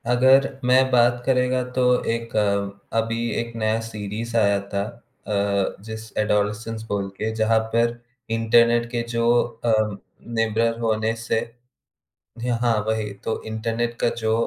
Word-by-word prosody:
अगर 130 +2 +5 0.2
मैं 130 +1 +4
बात 120 0 +4
करेगा 125 -1 +2
तो 130 - -1 0.3
एक 115 -1 -5 0.6
अभी 115 +1 -1 0.2
एक 115 0 -8
नया 110 0 0
सीरीज़ 110 +2 -5
आया 100 -2 +3
था, 100 - -1 0.5
अ, 100 -2 0
जिस 110 0 -8
अडोलेसेंस 105 +1 0
बोल 100 -2 -1
के, 110 +1 -2
जहाँ 110 0 +3 0.2
पर 115 0 +3 0.4
इंटरनेट 115 +1 +4
के 120 -1 -1
जो 115 0 +1 0.4
अम, 110 -3 +2 0.4
निर्भर 115 +1 +1
होने 110 -1 0
से 115 0 -1 1.0
जी 120 +2 -3
हाँ 115 -2 +3
वही। 110 -1 -1
तो 110 - -2
इंटरनेट 115 +2 -2
का - - +3
जो 110 0 +2
115 Hz, 135 wpm, -23 LUFS, 110-120 Hz, 1.0 s, अगर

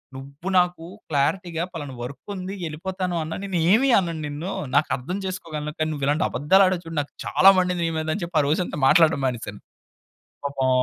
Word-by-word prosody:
నువ్వు 140 +7 -7
నాకు 180 -2 +2 0.3
క్లారిటీగా 160 +4 0
పలానా 145 -5 -6
వర్కుంది, 185 +10 -6
యెళ్ళిపోతాను 180 +3 -3
అన్నా 160 +1 -5
నేను 195 -3 -2
ఏమీ 255 +7 +4
అనను 170 -3 -3
నిన్ను, 150 +6 -5 0.2
నాకు 145 +2 +3
అర్థం 175 +10 -5
చేసుకోగలను, 155 -5 -4
కానీ 155 - 0
నువ్విలాంటి 145 +2 0
అబద్దాలాడావు 185 +5 +3
చూడు, 165 -1 -8
నాకు 145 - -9
చాలా 195 - +6
మండింది 180 -1 +1
నీ - - 0
మీద 155 0 -3
అని 195 - -4
చెప్పి, 170 -2 -2
ఆ - - -1
రోజంతా 160 +1 -1
మాట్లాడడం 160 -2 +5
మానేశాను. 115 -5 -3 0.9
పాపం 135 -2 -1
165 Hz, 165 wpm, -24 LUFS, 145-185 Hz, 0.9 s, చాలా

